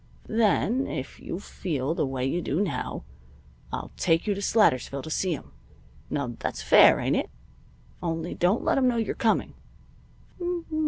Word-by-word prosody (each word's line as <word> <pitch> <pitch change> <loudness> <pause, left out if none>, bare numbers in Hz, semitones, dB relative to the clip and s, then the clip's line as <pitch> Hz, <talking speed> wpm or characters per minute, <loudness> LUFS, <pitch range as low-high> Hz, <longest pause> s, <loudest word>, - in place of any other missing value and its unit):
Then, 230 +3 +2
if 130 - -5
you 175 - -5
feel 155 -7 -3
the 150 - 0
way 130 -1 -2
you 170 +7 0
do 160 0 -1
now, 205 - -2 0.7
I'll - - -5
take 165 -2 +2
you 210 - +1
to 200 - -5
Slatersville 140 - +2
to 160 - -7
see 185 +2 0
him. - - -12 0.6
Now 135 -5 -2
that's - - -3
fair, - - +7
ain't - - +1
it? - - -2 0.7
Only 165 0 -2
don't 180 +6 +1
let - - +2
him 255 - +3
know 245 -1 +2
you're 225 - 0
coming." 230 -4 +1
175 Hz, 160 wpm, -26 LUFS, 140-215 Hz, 0.7 s, fair